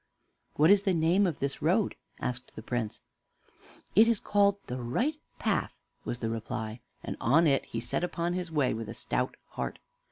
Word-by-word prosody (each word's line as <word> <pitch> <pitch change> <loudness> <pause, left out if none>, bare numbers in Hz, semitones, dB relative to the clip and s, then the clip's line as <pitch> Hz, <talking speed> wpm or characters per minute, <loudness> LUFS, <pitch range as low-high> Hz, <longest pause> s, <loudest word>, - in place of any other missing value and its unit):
"What 155 +5 +6
is 200 -1 +6
the 195 -3 +1
name 170 +5 +4
of 165 - -2
this 140 0 -2
road?" 185 +7 +2 0.3
asked 125 0 -4
the 110 - -8
Prince. 120 -3 -3 0.9
"It 220 +4 +8
is 230 -3 +3
called 200 -1 +3
the 125 +1 -4
'Right 235 - 0 0.2
Path'" - - 0 0.3
was 120 - -2
the 115 -2 -2
reply; 115 0 -4 0.2
and - - -4
on 150 +9 +5
he 135 -5 +1
set 120 +8 -2
upon 175 -1 -1
his 180 -2 -3
way 145 -5 +2
with 110 -1 -5
a 115 - -6
stout 125 +2 -1
heart. - - -4
145 Hz, 180 wpm, -30 LUFS, 120-185 Hz, 0.9 s, It